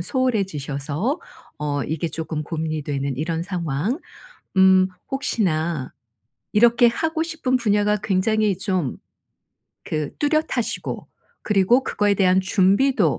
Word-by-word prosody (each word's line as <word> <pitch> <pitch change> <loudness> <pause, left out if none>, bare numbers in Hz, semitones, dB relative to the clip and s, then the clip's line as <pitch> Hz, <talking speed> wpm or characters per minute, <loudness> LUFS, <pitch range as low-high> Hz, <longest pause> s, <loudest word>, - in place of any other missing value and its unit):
소홀해지셔서 190 - -1 0.4
어 145 -1 -2
이게 160 +1 -2
쪼끔 160 -1 -4
고민이 155 -1 -3
되는 140 -2 -3
이런 165 +2 -2
상황. 175 - -2 0.6
음 190 0 +6 0.2
혹시나 170 - -1 0.6
이렇게 235 +2 +5
하고 320 +6 0
싶은 320 -6 0
분야가 210 -2 +2
굉장히 205 0 +1
좀 185 - -1 0.9
그 155 -2 -3
뚜렷하시고 295 -5 -1 0.3
그리고 210 +6 +3
그거에 205 -1 +1
대한 185 -1 +3
준비도 190 - +2
190 Hz, 250 characters per minute, -22 LUFS, 155-230 Hz, 0.9 s, 음